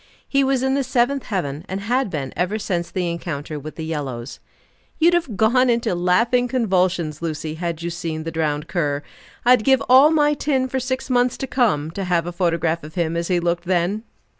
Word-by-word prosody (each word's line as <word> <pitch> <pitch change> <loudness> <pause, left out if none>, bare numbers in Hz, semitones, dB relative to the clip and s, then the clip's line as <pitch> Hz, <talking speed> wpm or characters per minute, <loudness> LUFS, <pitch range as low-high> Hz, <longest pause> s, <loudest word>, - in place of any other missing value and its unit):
He 275 -1 +2
was 265 -1 +1
in 265 0 +1
the 275 0 +1
seventh 260 +2 +1
heaven, 150 -8 -3
and 190 +1 -3
had 245 +3 0
been 140 -6 -4
ever 180 +5 0
since 175 -5 -2
the 180 -2 -2
encounter 155 -3 -4
with 155 +2 -9
the 160 - -5
yellows. 135 -6 -5 0.6
"You'd 335 +2 +4
have 305 - 0
gone 250 +3 +4
into 235 -3 +1
laughing 225 +8 +2
convulsions, 185 - 0
Lucy 155 -1 -3
had 170 0 -4
you 170 - -2
seen 165 -2 -4
the 165 - -4
drowned 155 -1 -1
cur. 150 -4 -1 0.4
I'd 245 -2 +5
give 265 +1 +4
all 265 +4 +7
my 295 -2 +3
tin 275 -3 0
for 265 +1 -2
six 260 +1 -3
months 245 0 +2
to - - -3
come 210 - +1
to 195 +3 -4
have 175 -2 +1
a 175 - -4
photograph 170 -2 0
of 155 +1 -10
him 170 -2 0
as 170 0 -1
he 180 -2 +2
looked 175 0 -1
then!" 180 +3 0
180 Hz, 205 wpm, -21 LUFS, 165-250 Hz, 0.6 s, all